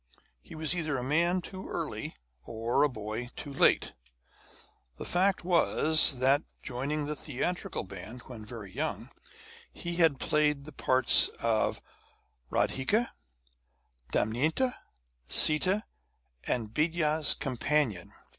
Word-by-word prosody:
He - - -13
was 155 +1 +1
either 155 -5 -2
a 125 - -4
man 170 +7 +1
too 190 +1 -8
early - - -5 0.3
or 115 +1 -1
a 150 - +4
boy 110 +1 -6
too 140 - -7
late. - - +2 1.0
The - - -7
fact 190 +1 +1
was 160 -5 +5
that, 135 +3 +3 0.2
joining 140 +4 -3
the 150 +1 -4
theatrical 155 +5 -4
band 95 +6 -10
when 120 -4 -10
very 105 -4 -10
young, - - -4 0.6
he 170 0 -5
had 160 -6 +3
played 150 -2 +1
the 155 - -10
parts 130 -2 +4
of 115 -2 0 0.7
Radhika, 210 - 0 1.0
Damaynti, 155 - 0 0.6
Sita, 185 +7 +5 0.6
and 115 -3 -3
Bidya's 155 -1 +1
Companion. 130 - -1
145 Hz, 115 wpm, -29 LUFS, 125-160 Hz, 1.0 s, was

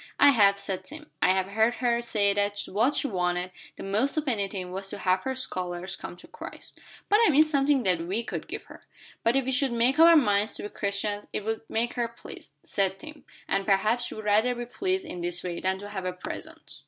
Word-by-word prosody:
"I 285 - +8
have," 200 -5 +5
said 195 -2 -3
Tim. 305 +1 -10
"I - - +4
have 190 0 -1
heard 220 +3 +2
her 240 -1 +1
say 205 -4 +1
that 205 0 0
what 230 +9 +1
she - - 0
wanted 180 -5 -1 0.3
the - - -7
most 215 +10 0
of 305 -1 -1
anything 195 -6 -1
was 195 +1 -5
to - - -5
have 185 -1 +1
her 265 0 -1
scholars 185 -6 -3
come 175 - -8
to - - -15
Christ." - - -11 0.3
"But 415 - +4
I 450 - +6
mean 305 0 +6
something 285 -3 +2
that 180 -4 +2
we 190 +7 -2
could - - -5
give - - -6
her." - - -14 0.4
"But 230 +2 +3
if 270 -2 +2
we 265 - -1
should 265 0 +1
make 245 +5 +2
up 330 - +9
our 335 -1 +8
minds 210 -6 +2
to - - -5
be 205 - -5
Christians, 205 +1 -2
it 210 - -2
would 225 0 -2
make 235 +2 0
her 240 -2 -1
pleased," 235 0 -12
said 195 -1 0
Tim, 300 +5 -12 0.2
"and 195 0 0
perhaps 215 +5 +2
she'd 215 - -6
rather 215 +4 +2
be 240 0 -5
pleased 375 +9 -2
in 180 - -7
this 175 +1 -1
way 175 -2 -4
than 190 0 0
to 205 +1 -9
have 190 -3 -5
a 180 - -2
present." 180 - -8
210 Hz, 235 wpm, -27 LUFS, 190-255 Hz, 0.4 s, up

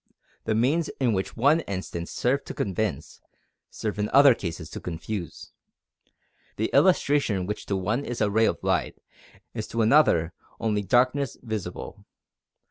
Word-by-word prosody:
The 110 - 0
means 145 +9 +1
which 110 -8 +1
in - - -12
one 145 +6 +4
instance 95 - -5
serve 135 +3 0
to - - -7
convince, 95 -6 -3 0.5
serve 105 -1 -4
in 105 - 0
other 140 -1 +7
cases 85 -6 -6
to - - -6
confuse. 90 +2 -6 1.0
The 110 - -2
illustration 140 - +3
which 105 +2 -5
to 100 - 0
one 105 +8 -1
is 120 -3 -5
a 105 -2 +1
ray 110 +2 +3
of - - +1
light, - - 0 0.6
is - - -4
to 115 -1 0
another 110 - +4 0.3
only 105 -2 0
"darkness 125 +6 +1
visible." 105 -7 -6
110 Hz, 145 wpm, -26 LUFS, 95-130 Hz, 1.0 s, other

